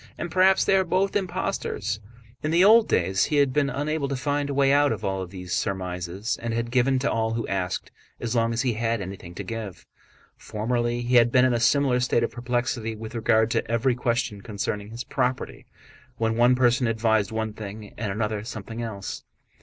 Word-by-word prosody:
And 170 - -5
perhaps 190 +1 +4
they 195 - +4
are 190 - +4
both 185 +2 0
impostors?" 180 - -2 0.4
In 150 - -2
the 170 +3 +4
old 225 +2 +7
days 95 +2 +2
he 150 - -1
had 140 -3 +3
been 145 -1 +2
unable 145 +2 -1
to 140 - -2
find 145 +2 -1
a - - -2
way 140 0 +4
out 145 0 +4
of 110 - -3
all 95 -1 -2
these 90 -1 -7
surmises 95 +1 -2
and 115 -1 -2
had 115 0 -2
given 130 +1 +3
to 135 +3 0
all 110 0 0
who 115 - -2
asked 90 -2 -3 0.3
as 120 +1 -3
long 115 0 +2
as 115 +3 -1
he 125 -3 +1
had 115 +1 -1
anything 95 -2 -8
to - - -5
give. 110 -5 -6 0.5
Formerly 120 +2 -2
he 125 +1 +3
had 120 0 +5
been 125 +1 +5
in 130 - +2
a 120 - +1
similar 130 +1 +3
state 125 -1 +1
of - - -1
perplexity 120 -2 -2
with 110 0 -8
regard 110 -1 +2
to 115 - -1
every 115 +2 +2
question 120 -4 -1
concerning 105 0 -4
his 115 +2 -6
property, 125 +1 -2 0.5
when 115 0 0
one 120 +2 +5
person 125 0 +3
advised 110 -2 +1
one 110 -1 -2
thing 105 -1 -8
and 105 -3 -3
another 105 0 -2
something 115 0 -6
else. 105 -4 -5
115 Hz, 200 wpm, -25 LUFS, 110-130 Hz, 0.5 s, old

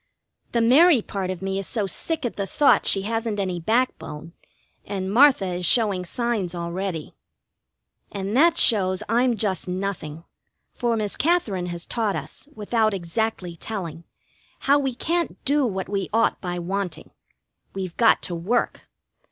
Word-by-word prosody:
The 235 - +2
Mary 265 +2 +6
part 195 -2 -4
of 185 0 -5
me 195 0 -1
is 195 - -5
so 215 -4 -1
sick 305 - -3
at 240 - -3
the 200 -1 -3
thought 285 +8 +3
she 195 - +2
hasn't 225 0 -2
any 185 -3 -2
backbone, 170 -6 -2 0.5
and 195 -1 -4
Martha 260 -4 +6
is 180 0 -3
showing 200 -5 +3
signs 210 -4 -2
already. 170 -1 -4 1.0
And 200 +1 -3
that 330 +5 +5
shows 190 -3 +4
I'm 240 +2 +2
just 190 -4 -2
nothing, 180 -4 -4 0.5
for 235 -2 -1
Miss 210 -2 -2
Katherine 235 - +1
has 170 -1 -5
taught 220 -4 -1
us, 295 - -7
without 215 0 +1
exactly 185 0 -3
telling, 170 -4 -6 0.6
how 285 +1 +4
we 270 -3 -2
can't 340 +5 -1
do 285 -1 +2
what 190 -3 -3
we 195 -2 -2
ought 230 +2 +1
by 180 -2 -3
wanting. 190 +1 -4 0.6
We've 185 -3 -5
got 230 - +4
to 180 - -4
work. 190 +9 -1
200 Hz, 150 wpm, -24 LUFS, 185-235 Hz, 1.0 s, Mary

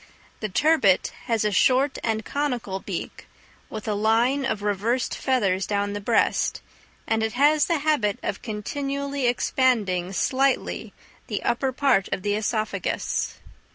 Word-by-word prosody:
The 215 - -3
turbit 215 - +3
has 225 -3 0
a 210 - +2
short 260 +7 +3
and 220 -1 -1
conical 245 -9 -2
beak, - - -6 0.4
with 215 0 -7
a 215 - +1
line 230 +6 +2
of 215 -6 -2
reversed 210 +5 0
feathers 195 -8 0
down 205 0 -1
the 205 - -4
breast; 225 +2 +1 0.5
and 225 0 0
it 220 0 -1
has 295 +4 +4
the 335 - +1
habit 285 -9 +1
of - - -3
continually 275 +5 -3
expanding, 220 -8 +1
slightly, 265 +6 0 0.4
the - - -3
upper 260 +2 0
part 260 -7 +2
of 185 - -2
the 205 - 0
œsophagus. 215 +1 -1
225 Hz, 140 wpm, -24 LUFS, 205-270 Hz, 0.5 s, has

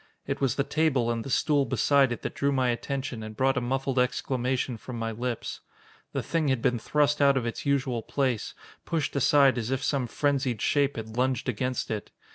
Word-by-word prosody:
It - - -3
was 135 -4 +2
the 140 - +1
table, 140 -5 +1
and 115 -1 -2
the - - -7
stool 145 +2 +2
beside 135 +1 +3
it, 120 - -4
that - - -3
drew 140 0 0
my 130 -2 +2
attention 130 0 -3
and 110 0 -8
brought 135 0 +2
a 125 - 0
muffled 135 +1 -1
exclamation 125 0 0
from 120 +2 -8
my 115 0 -2
lips. 120 +1 -4 0.5
The - - -2
thing 165 -3 0
had 130 -3 +2
been 120 +1 +1
thrust 145 +5 +1
out 140 -1 +5
of 125 - -1
its 115 +4 -4
usual 130 -4 +1
place, 130 -3 -1 0.3
pushed 160 -4 -2
aside 140 -1 +4
as 115 0 -3
if 135 0 -1
some 135 -4 0
frenzied 135 -3 0
shape 140 +4 +2
had 110 0 -7
lunged 130 +1 0
against 125 +1 -2
it. 105 -2 -4
130 Hz, 205 wpm, -27 LUFS, 120-140 Hz, 0.5 s, out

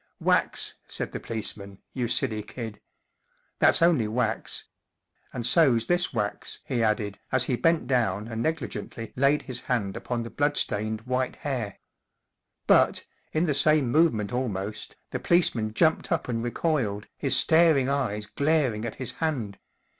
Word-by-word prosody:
44 - - -14
Wax," - - +1
said - - -5
the - - -5
policeman, 100 -3 -4 0.2
44 130 - -4
you 120 - +1
silly 115 -2 +1
kid. 110 -1 -8 0.8
That's - - +5
only 160 -11 +3
wax. 115 +4 -1 0.7
And 120 -2 -4
so's 125 -5 +4
this 175 -2 +1
wax," 105 -4 -3
he 125 -4 -1
added, 105 -2 0
as 130 -1 +4
he 130 - 0
bent 165 +5 +2
down 110 -5 0
and 115 -1 -4
negligently 125 -6 -4
laid 140 +3 +2
his 125 -3 -3
hand 105 -6 -2
upon 120 0 -3
the 115 - -8
blood 145 0 0
stained 110 +1 0
white 130 +2 -2
hair. 125 -8 -4 0.9
But, - - +3 0.3
in 155 +3 +1
the 150 - +1
same 145 -2 +3
movement 125 -10 +2
almost, 105 -4 -4 0.2
the - - -3
policeman 120 -11 +2
jumped 160 +3 +2
up - - 0
and 115 -2 -2
recoiled, 120 -5 -1
his 140 - +3
staring 160 -5 +4
eyes 125 -7 -1
glaring 140 -3 0
at 115 - -5
his 130 -2 -5
hand. 125 -12 -3
125 Hz, 155 wpm, -26 LUFS, 110-145 Hz, 0.9 s, That's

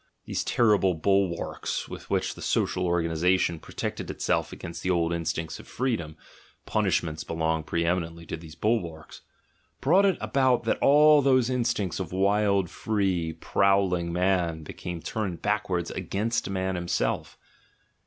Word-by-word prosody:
These - - -2
terrible 105 -6 +3
bulwarks, 95 +1 0
with - - -9
which - - 0
the - - -12
social 90 -1 0
organisation 85 0 +1
pro - - -14
tected - - -4
itself - - -1
against 85 - -7
the 90 - -2
old 85 -2 +1
instincts 80 -1 -3
of - - -13
freedom 110 -12 -2 0.5
(punish 100 -6 +1
ments 80 -2 -5
belong 80 0 -1
pre 85 +2 -1
eminently 85 -1 -2
to - - -4
these 80 -1 -11
bulwarks), 85 -9 -2 0.6
brought 185 +9 +4
it 190 - +1
about 130 -3 +2
that 115 - 0
all 150 +1 +6
those 130 -2 +3
instincts 115 -8 -1
of 90 -4 -4
wild, 100 0 +2
free, 95 -5 -1
prowling 95 -2 +1
man 90 -3 0
became 85 +2 -6
turned 100 -6 -3
backwards 95 -5 -1
against 100 +6 -2
man 95 -1 -1
himself. 85 -1 -2
90 Hz, 145 wpm, -27 LUFS, 85-105 Hz, 0.6 s, all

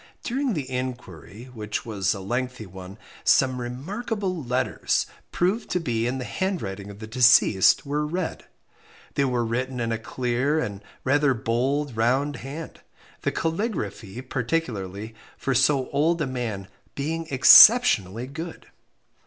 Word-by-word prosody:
During 255 -2 -1
the 140 -4 -3
inquiry, 125 -3 -6
which 105 -2 -4
was 100 -5 -1
a - - -6
lengthy 125 +3 -3
one, 95 +1 -11 0.3
some 130 -2 +3
remarkable 185 - -4
letters, 125 +1 0 0.3
proved 195 +6 0
to 180 - 0
be 120 -8 -1
in 130 +2 -2
the 125 - -5
handwriting 105 - -3
of 100 - -10
the 110 - -8
deceased, 115 -4 +4
were 145 +2 -1
read. 180 +4 -4 0.7
They 140 - +1
were 125 -2 0
written 125 +3 -2
in 115 -1 -1
a 115 - -1
clear, 125 +5 -1
and 100 -7 -4 0.2
rather 140 0 +2
bold 130 +4 -1
round 130 +5 +1
hand, 145 +6 -8 0.4
the - - 0
caligraphy 155 - -3
particularly, 115 - -3 0.2
for 135 - -1
so 130 +1 +3
old 160 +4 +1
a 150 - 0
man, 120 -7 -4 0.3
being 160 +3 -3
exceptionally 130 - +7
good. 160 +5 -8
130 Hz, 135 wpm, -25 LUFS, 115-150 Hz, 0.7 s, exceptionally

